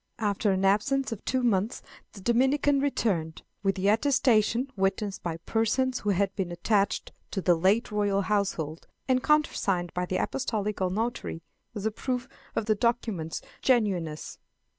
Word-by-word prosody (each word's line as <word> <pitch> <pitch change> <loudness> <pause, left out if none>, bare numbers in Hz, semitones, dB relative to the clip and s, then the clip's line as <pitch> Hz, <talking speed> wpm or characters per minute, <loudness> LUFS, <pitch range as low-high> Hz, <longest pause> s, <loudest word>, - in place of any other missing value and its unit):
After 205 -1 +1
an 190 0 +1
absence 265 +8 +2
of 225 - -5
two 260 -1 0
months 215 0 +1 0.3
the 200 - -11
Dominican 265 +6 +3
returned, 195 - -1 0.2
with 195 -1 0
an 190 - -2
attestation, 235 +1 +3
witnessed 195 +1 -1
by 165 -2 -3
persons 230 +8 0
who 210 - -2
had 195 0 +1
been 185 -3 -2
attached 200 +3 0 0.2
to 195 - -3
the 180 -1 +4
late 190 +8 +2
royal 205 -1 +1
household, 185 -7 -1 0.2
and 255 -1 +3
countersigned 195 - +1
by 180 0 -2
the 185 - -1
apostolical 210 -7 -1
notary, 215 -4 -3 0.3
as 205 0 -4
a 220 - +1
proof 250 +3 -3 0.3
of 220 - 0
the 215 - +3
document's 215 -7 -1 0.2
genuineness. 190 -11 0
210 Hz, 150 wpm, -28 LUFS, 190-240 Hz, 0.3 s, the